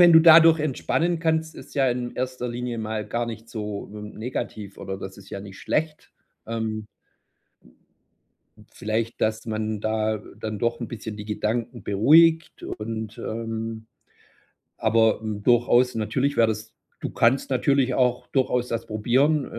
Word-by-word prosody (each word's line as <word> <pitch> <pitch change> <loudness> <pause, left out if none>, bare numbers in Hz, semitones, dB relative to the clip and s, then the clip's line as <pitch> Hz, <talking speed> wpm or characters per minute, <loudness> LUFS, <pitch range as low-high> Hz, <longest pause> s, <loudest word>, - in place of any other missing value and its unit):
wenn 175 -1 +8
du 160 - +9
dadurch 165 -1 +8
entspannen 165 +4 0
kannst, 160 -1 0
ist - - -12
ja 135 -2 +3
in 120 0 -3
1. 125 -1 -3
Linie 120 0 -4
mal 110 -1 -3
gar 120 +3 -2
nicht 115 0 -7
so 105 -2 -5
w 105 - -8
negativ 105 -2 -6
oder 95 0 -5
das 95 0 -8
ist 100 - -14
ja 100 - -5
nicht 100 -1 -10
schlecht. 155 0 -2 0.3
Ähm. 110 -1 -3 1.9
Vielleicht, 110 +2 -2
dass 110 +1 0
man 110 -1 -2
da 110 0 0 0.2
dann 110 -2 -4
doch 120 +1 -1
'n 120 - -4
bisschen 110 -2 -6
die 105 - -7
Gedanken 110 +2 -2
beruhigt 160 +11 +4
und, 110 0 -5
ähm 115 0 -4 0.9
aber 110 0 +3
durchaus, 120 +4 +3
natürlich 130 +6 0
wäre 115 -1 +5
das 110 +1 -4 0.3
du - - -3
kannst 125 +4 +2
natürlich 130 0 +2
auch 125 -1 +1
durchaus 125 -2 +1
das 115 0 -2
probieren, 130 +8 +2
115 Hz, 145 wpm, -24 LUFS, 110-130 Hz, 1.9 s, du